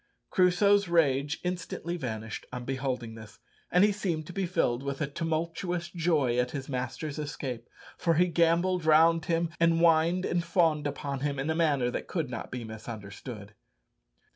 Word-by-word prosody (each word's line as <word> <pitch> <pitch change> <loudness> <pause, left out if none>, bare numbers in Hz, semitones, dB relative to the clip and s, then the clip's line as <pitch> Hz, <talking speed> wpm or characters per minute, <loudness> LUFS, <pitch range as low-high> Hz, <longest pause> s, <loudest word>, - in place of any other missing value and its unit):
Crusoe's 200 +2 +4
rage 150 -3 +2
instantly 180 -1 -3
vanished 110 -8 -5
on 125 -1 -6
beholding 130 -3 -3
this, 110 -1 -12 0.3
and 180 +2 +4
he 210 - +5
seemed 175 -6 -2
to 180 - -9
be 195 -1 -1
filled 135 -8 +1
with 140 +1 -3
tumultuous 170 +2 -2
joy 155 -8 +1
at 125 0 +1
his 135 0 -5
master's 135 +3 -4
escape, 130 -5 -5 0.3
for 165 -2 +2
he 175 +3 +5
gambolled 175 +1 +2
round 160 +1 +5
him, 170 0 0
and 165 0 +4
whined 170 +2 +3
and 175 -1 0
fawned 160 -5 +2
upon 140 -1 -4
him 140 +1 -2
in 135 +4 -1
a - - -1
manner 145 -7 +2
that - - -4
could 160 -8 -2
not 115 - -5
be 125 -1 -5
misunderstood. 110 -1 -8
155 Hz, 165 wpm, -29 LUFS, 130-170 Hz, 0.3 s, he